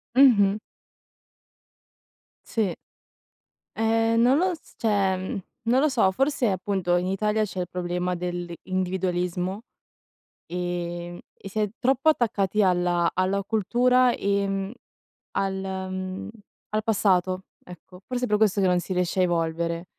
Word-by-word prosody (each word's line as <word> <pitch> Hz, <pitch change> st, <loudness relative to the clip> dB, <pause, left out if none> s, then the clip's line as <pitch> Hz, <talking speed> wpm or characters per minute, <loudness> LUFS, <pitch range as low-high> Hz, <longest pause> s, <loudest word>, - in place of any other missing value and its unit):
Mh-mh. 215 Hz, -7 st, +6 dB, 1.9 s
Sì, 215 Hz, -6 st, 0 dB, 1.0 s
ehm, 225 Hz, +1 st, +2 dB
non 255 Hz, +3 st, +5 dB
lo 365 Hz, +2 st, +2 dB
s 320 Hz, -, -13 dB
cioè, 200 Hz, -4 st, +1 dB, 0.5 s
non 250 Hz, +2 st, +4 dB
lo 300 Hz, -, +4 dB
so, 235 Hz, -9 st, +3 dB
forse 270 Hz, +1 st, +1 dB
appunto 185 Hz, -2 st, 0 dB
in 175 Hz, -, -1 dB
Italia 210 Hz, +3 st, +1 dB
c'è 190 Hz, -2 st, -5 dB
il 180 Hz, -, -4 dB
problema 180 Hz, 0 st, -2 dB
dell'individualismo, 180 Hz, +1 st, -2 dB, 0.8 s
ehm, 175 Hz, 0 st, -4 dB
e 195 Hz, -, -10 dB
si 210 Hz, -, -8 dB
è 210 Hz, -, +2 dB
troppo 265 Hz, +4 st, +3 dB
attaccati 215 Hz, -7 st, +1 dB
alla 175 Hz, -2 st, +2 dB
alla 190 Hz, +2 st, +1 dB
cultura 245 Hz, +5 st, +3 dB
e 195 Hz, 0 st, -1 dB, 0.6 s
al, 195 Hz, -1 st, 0 dB
mhmm, 190 Hz, 0 st, -4 dB, 0.4 s
al 215 Hz, 0 st, -1 dB
passato, 190 Hz, -4 st, +1 dB, 0.2 s
ecco. 180 Hz, +1 st, -13 dB
Forse 250 Hz, 0 st, -1 dB
per 210 Hz, -3 st, +2 dB
questo 210 Hz, -2 st, +3 dB
che 195 Hz, -, +3 dB
non 180 Hz, -1 st, +3 dB
si 180 Hz, -, -7 dB
riesce 180 Hz, +1 st, 0 dB
a -, -, +5 dB
evolvere, 170 Hz, 0 st, -1 dB
190 Hz, 125 wpm, -25 LUFS, 180-220 Hz, 1.9 s, Mh-mh